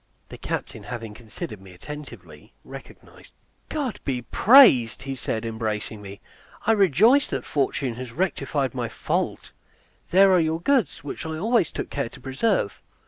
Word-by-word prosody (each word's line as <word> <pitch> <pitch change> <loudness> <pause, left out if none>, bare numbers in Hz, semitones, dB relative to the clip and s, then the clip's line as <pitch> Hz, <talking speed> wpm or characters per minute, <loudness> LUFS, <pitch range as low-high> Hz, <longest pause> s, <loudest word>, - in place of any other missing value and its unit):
The - - -9
captain 110 - -5
having 110 +1 -7
considered 110 -2 -8
me 95 -1 -14
attentively 150 +11 -11
recognized - - -13
me. - - -43 0.3
"God 280 -7 -3
be 125 -3 -2
praised!" 160 - +6
said 115 -3 -3
he, - - -3
embracing 110 -1 -4
me; 100 0 -10 0.5
"I 225 - +4
rejoice 215 - +4
that - - -4
fortune 135 -3 -1
has 125 -2 -7
rectified 145 -3 -1
my 120 -3 -3
fault. - - -3 0.6
There 190 +2 +6
are 185 - +5
your 160 0 0
goods, 215 - +1
which 145 - -6
I 160 0 -4
always 220 -1 +1
took - - -5
care 140 -4 -2
to - - -14
preserve." 135 - -1
140 Hz, 155 wpm, -24 LUFS, 115-190 Hz, 0.6 s, praised